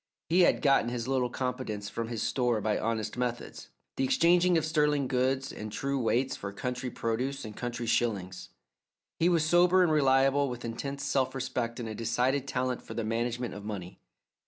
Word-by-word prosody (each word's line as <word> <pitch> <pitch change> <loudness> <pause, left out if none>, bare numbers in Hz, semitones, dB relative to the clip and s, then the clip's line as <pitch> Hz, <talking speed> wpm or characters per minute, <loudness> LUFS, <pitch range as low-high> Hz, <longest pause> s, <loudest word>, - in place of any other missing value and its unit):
He 175 +3 +3
had 180 - +4
gotten 135 -5 +4
his 120 -1 -3
little 130 -2 +1
competence 125 -5 -3
from 115 +2 -4
his 115 -2 -3
store 125 -4 +1
by 105 0 0
honest 115 0 -2
methods 125 -1 -4 0.3
the - - +1
exchanging 175 +5 +4
of 160 - 0
sterling 150 -3 +2
goods 130 +1 0
and 105 0 -7
true 140 +4 -2
weights 125 +2 +1
for 100 - -6
country 125 +4 -4
produce 125 +4 -2
and 105 -1 -8
country 120 -1 -4
shillings. 100 -6 -1 0.7
He 170 - +4
was 165 -3 +2
sober 180 +2 +5
and 170 - +2
reliable, 135 -1 +3
with 120 -1 -6
intense 140 +4 -4
self 135 -2 0
respect 125 -2 -3
and 115 - -4
a 110 - -4
decided 125 +5 0
talent 125 -1 -1
for - - -9
the 115 - -2
management 120 +2 -2
of 105 - -8
money. 100 -4 -6
125 Hz, 180 wpm, -29 LUFS, 115-140 Hz, 0.7 s, sober